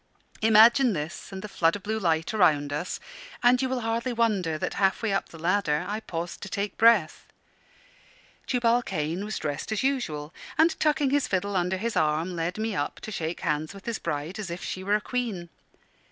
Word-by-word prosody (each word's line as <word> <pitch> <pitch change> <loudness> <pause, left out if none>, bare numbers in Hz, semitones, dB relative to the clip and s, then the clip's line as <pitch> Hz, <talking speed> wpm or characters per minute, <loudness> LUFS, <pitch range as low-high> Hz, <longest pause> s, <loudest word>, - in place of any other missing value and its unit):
Imagine 225 +3 +6
this 155 +4 -5
and 190 0 -7
the - - -4
flood 165 -4 +2
of 200 - -8
blue 220 +1 -2
light 165 -1 0
around 150 -8 +3
us, 150 +5 -3 0.4
and 245 +1 +5
you 260 - 0
will 255 -1 -1
hardly 230 +2 -1
wonder 205 -9 +1
that, - - -3
half 195 +3 +2
way 220 -3 +1
up 195 - -1
the 165 - -12
ladder, 170 -2 +1
I 210 +2 -2
paused 175 -5 -5
to 200 - -6
take 200 +1 -3
breath. 220 -9 +4 1.2
Tubal 240 -1 +2
Cain 160 -2 -3
was 210 -1 -4
dressed 150 +5 -4
as 220 - 0
usual, 160 - -1 0.2
and 320 +2 +5
tucking 295 -3 +2
his 285 -1 +2
fiddle 200 +1 -1
under 180 +1 +1
his 230 +4 -3
arm, 155 +4 +1
led 170 +3 -2
me 220 0 -1
up 145 - -2
to 215 - -7
shake 165 -3 -3
hands 155 +3 -1
with 195 - -12
his 235 -2 -3
bride 160 +4 -4
as 200 -4 -4
if 170 +1 -6
she 185 - -4
were 200 +2 +2
a 210 - 0
queen. 215 -9 -3
195 Hz, 200 wpm, -27 LUFS, 165-225 Hz, 1.2 s, Imagine